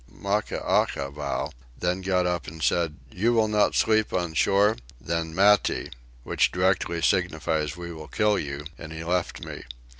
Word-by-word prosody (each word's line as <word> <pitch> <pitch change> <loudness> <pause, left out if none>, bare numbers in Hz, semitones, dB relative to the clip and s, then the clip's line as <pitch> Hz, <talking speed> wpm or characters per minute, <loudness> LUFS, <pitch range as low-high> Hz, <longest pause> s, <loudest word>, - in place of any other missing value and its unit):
Maccaackavow 75 -8 -1 0.3
then 90 +4 -1
got 90 -1 +1
up 90 -1 -1
and 80 0 -7
said: 85 -3 +1 0.2
"You 115 +6 +1
will 110 -2 +3
not 105 -1 +2
sleep 110 -1 +3
on 85 -3 -1
shore? 100 +6 +3 0.2
then 85 +4 -3
Mattie" 100 +1 +3 0.3
(which - - +2
directly 90 -2 +1
signifies 80 -4 0
we 85 -1 -6
will 80 -1 -9
kill 105 -2 +2
you) 70 0 -5
and 80 -1 -8
he 80 0 -6
left 90 +1 -2
me. - - -7
90 Hz, 150 wpm, -26 LUFS, 80-100 Hz, 0.3 s, will